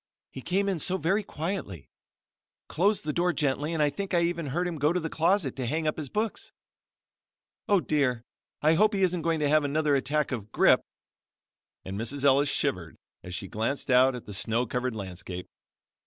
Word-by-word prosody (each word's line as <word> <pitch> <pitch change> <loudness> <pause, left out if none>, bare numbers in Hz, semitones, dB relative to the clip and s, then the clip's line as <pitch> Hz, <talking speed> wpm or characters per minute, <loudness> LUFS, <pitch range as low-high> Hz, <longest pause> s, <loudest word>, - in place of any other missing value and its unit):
"He 130 - -8
came 195 +7 0
in 190 -4 0
so 185 +4 +1
very 190 +6 +1
quietly, 160 - -5 0.8
closed 200 +6 +1
the 150 - -1
door 175 +2 +1
gently 145 +1 0
and 160 -2 +1
I 145 - +2
think 195 +5 -3
I 170 - +4
even 170 -2 -1
heard 175 +7 -1
him 165 -3 -4
go 150 +3 +3
to 180 - 0
the 160 -2 -4
closet 165 -3 +1
to 130 -2 -2
hang 155 +5 -1
up 155 - 0
his 150 -4 -5
books. 215 - -3 1.2
Oh! 200 -2 +5
dear. 135 -8 0 0.4
I 155 +1 +5
hope 210 +5 +3
he 195 - +1
isn't 180 -2 +1
going 165 0 0
to 145 - +2
have 155 0 +4
another 145 0 +1
attack 145 +3 0
of 110 -5 -5
'Grippe,'" - - +5 1.0
and 95 +2 -5
Mrs. 135 +5 -2
Ellis 140 +1 +4
shivered - - -1 0.3
as 90 0 -6
she 95 - -5
glanced 115 +7 -2
out 130 +1 +5
at 125 - -8
the 105 - -8
snow 110 +4 0
covered 125 0 -2
landscape. 95 -2 -7
150 Hz, 195 wpm, -27 LUFS, 125-175 Hz, 1.2 s, Oh